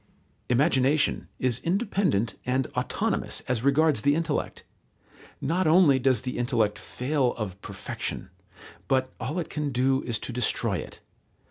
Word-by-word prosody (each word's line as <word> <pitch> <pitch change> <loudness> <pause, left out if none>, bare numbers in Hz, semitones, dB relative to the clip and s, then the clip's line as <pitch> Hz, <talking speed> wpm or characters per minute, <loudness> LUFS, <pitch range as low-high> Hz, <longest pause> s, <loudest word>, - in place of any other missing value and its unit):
Imagination 135 +2 +2
is 125 -2 +1
independent 180 - 0
and 130 +1 0
autonomous - - -1
as 125 -2 -2
regards 140 -2 +3
the 145 +3 +3
intellect. 160 -2 -2 0.8
Not 170 +5 0
only 155 -5 +5
does 130 0 +2
the 125 -1 -4
intellect 115 -4 +1
fail 130 -1 -1
of 100 -4 -5
perfection, - - -6 0.6
but 130 -1 +1
all 150 +7 -3
it 175 - -3
can 150 -2 -2
do 130 +2 +2
is 120 -3 -2
to 125 - -5
destroy 125 -1 +1
it. - - -8
135 Hz, 135 wpm, -26 LUFS, 125-155 Hz, 0.8 s, only